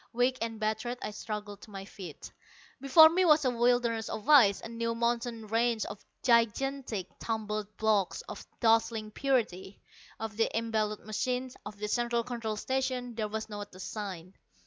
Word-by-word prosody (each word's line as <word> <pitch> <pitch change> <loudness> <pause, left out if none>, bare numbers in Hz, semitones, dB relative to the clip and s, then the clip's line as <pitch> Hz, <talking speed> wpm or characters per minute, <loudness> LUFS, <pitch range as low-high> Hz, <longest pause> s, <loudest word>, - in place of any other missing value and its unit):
Weak 245 +2 +2
and 225 -1 -3
battered, 220 +3 -1
I - - -3
struggled 210 -1 -6
to - - -13
my 195 -1 -7
feet. 185 -6 -10 0.5
Before 295 +4 +9
me 350 +4 +2
was 305 -4 +5
a 255 - +3
wilderness 240 -2 +1
of 215 - -5
ice, 240 -10 +7
a - - -7
new 230 0 -2
mountain 235 -1 -1
range 230 +1 +1
of 205 - -8 0.2
gigantic 235 -2 +1
tumbled 215 -2 -3
blocks 215 -4 +1
of - - -8 0.2
dazzling 225 -2 +2
purity. 215 -7 -1 0.4
Of 220 -1 -5
the 225 - +2
embattled 215 -2 -1
machines, 250 +4 -2
of 210 0 -9
the 210 +1 -3
Central 235 +1 0
Control 230 -3 -3
Station, 255 +1 -2
there 220 -2 -2
was 220 +1 -4
not 205 -3 -8
a - - -12
sign. 190 -3 -6
225 Hz, 165 wpm, -30 LUFS, 210-245 Hz, 0.5 s, Before